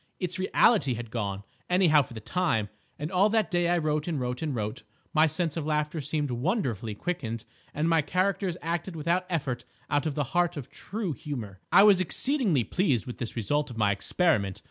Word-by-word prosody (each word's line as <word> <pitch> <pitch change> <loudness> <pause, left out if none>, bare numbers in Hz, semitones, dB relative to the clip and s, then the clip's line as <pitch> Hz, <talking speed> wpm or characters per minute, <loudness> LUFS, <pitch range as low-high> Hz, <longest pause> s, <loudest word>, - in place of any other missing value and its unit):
Its 180 -1 -2
reality 185 - +3
had 115 -1 -7
gone, 100 -4 -3 0.3
anyhow 180 -5 +5
for 125 -3 -8
the - - -5
time, 110 - 0 0.3
and 150 +4 -4
all 195 +3 +4
that 215 -5 +1
day 175 -1 +2
I 175 - +3
wrote 150 -1 0
and 160 -5 -1
wrote 125 0 -3
and 150 -4 -2
wrote. 105 -2 -3 0.3
My 155 +1 +5
sense 160 0 -1
of 160 -3 -3
laughter 150 +1 0
seemed 145 0 -2
wonderfully 120 - -1
quickened 115 -8 -4 0.3
and 155 +2 -1
my 165 -1 +4
characters 185 +3 0
acted 170 +2 -2
without 170 +4 0
effort 135 -8 -2 0.3
out 145 +1 +2
of 145 - -3
the 145 - +1
heart 175 -1 +2
of 135 - -7
true 200 -5 -4
humour. 115 -8 -6
I 195 - +8
was 200 -3 +6
exceedingly 200 - +2
pleased 140 - +1
with 125 - -7
this 120 - -4
result 145 +6 0
of 120 - -9
my 105 -2 +3
experiment. 100 - +1
155 Hz, 195 wpm, -28 LUFS, 120-180 Hz, 0.3 s, I